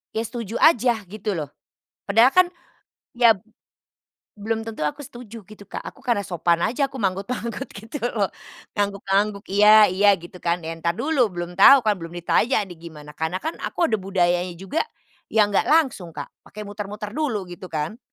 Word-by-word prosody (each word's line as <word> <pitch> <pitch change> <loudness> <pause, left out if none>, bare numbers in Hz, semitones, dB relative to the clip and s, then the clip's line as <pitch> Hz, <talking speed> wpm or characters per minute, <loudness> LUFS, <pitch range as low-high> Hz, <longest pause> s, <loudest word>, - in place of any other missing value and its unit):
ya 220 - 0
setuju 230 -1 -6
aja 240 -7 +4
gitu 210 +1 -4
loh, 150 -4 -5 0.6
padahal 225 +6 +5
kan 365 0 +5 0.7
ya 235 -3 +6 1.0
belum 225 +2 -2
tentu 225 -7 -6
aku 150 - -4
setuju 235 -3 -11
gitu 210 -1 -13
Kak. - - -6
Aku - - -10
karena 230 -5 0
sopan 170 -1 +1
aja 275 +3 0
aku 265 - -8
manggut-manggut 205 +3 -3
gitu 225 +8 -8
loh, 205 -3 0 0.5
ngangguk-ngangguk, 200 0 0
"Iya, 210 +2 +7
iya," 200 +2 +3
gitu 175 +1 -12
kan 170 0 -1
ya. 165 - -4
Entar 170 +1 -2
dulu 280 -6 +1
belum 175 -1 -5
tahu 275 +6 +8
kan 210 - +4
belum 165 +1 -8
ditanya 215 +6 +1
nih 175 -3 -12
gimana 150 -1 -12
karena 160 +3 -2
kan 320 - -2
aku - - -5
ada 220 - +1
budayanya 180 -2 0
juga, 195 - -3 0.5
yang 210 -2 +3
nggak - - +2
langsung 265 - +2
Kak 145 -3 -7 0.2
pakai 210 0 -10
muter-muter 205 +1 -6
dulu 240 -11 -2
gitu 175 +1 -10
kan. 155 +7 -3
205 Hz, 170 wpm, -23 LUFS, 180-230 Hz, 1.0 s, tahu